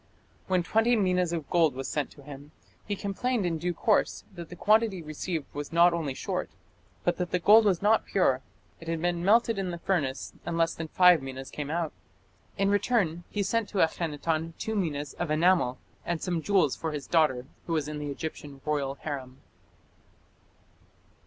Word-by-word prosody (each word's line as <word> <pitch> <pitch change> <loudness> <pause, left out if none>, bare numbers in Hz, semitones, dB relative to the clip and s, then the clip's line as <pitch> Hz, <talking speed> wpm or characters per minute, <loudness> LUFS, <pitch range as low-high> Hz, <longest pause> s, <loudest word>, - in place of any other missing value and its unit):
When 185 -2 +2
twenty 225 +6 +3
minas 180 -4 +1
of 160 -5 -3
gold 165 -6 +3
was 135 0 -4
sent 150 -2 -2
to 140 - -16
him, 145 +1 -11 0.3
he 205 - -1
complained 205 +3 -1
in 165 -2 -1
due 175 +1 -2
course 210 +4 +1
that 170 -3 -9
the 180 - -8
quantity 215 -1 +2
received 155 0 -4
was 145 0 -5
not 170 +1 +5
only 155 -6 -2
short 185 +4 -3 0.5
but 175 - +1
that 180 -1 -2
the - - +1
gold 215 +5 +6
was 195 -3 +2
not 220 +2 +3
pure; 135 -9 +2 0.4
it 165 - -12
had 165 0 -1
been 175 0 -1
melted 225 +2 +3
in 190 -2 -2
the 170 - -4
furnace, 155 -7 -2
and 170 - -3
less 165 0 +2
than 160 - -5
five 180 -1 +6
minas 135 0 -7
came 145 -1 -5
out. 165 0 -2 0.6
In 195 0 +2
return 200 -5 +1
he 205 - -1
sent 230 +1 0
to 205 - -5
Akhenaton 160 0 -1
two 220 - -3
minas 150 -7 -2
of 175 - -2
enamel, 155 -5 +3 0.3
and 175 -1 -2
some 175 -1 -2
jewels 175 -4 +2
for 160 -1 -4
his 145 -2 -5
daughter, 150 -7 +2 0.2
who 165 - -1
was 155 -3 0
in 150 0 -5
the 145 0 -4
Egyptian 145 -1 -6
royal 140 -3 -1
harem. 135 -4 -6
170 Hz, 185 wpm, -28 LUFS, 150-190 Hz, 0.6 s, gold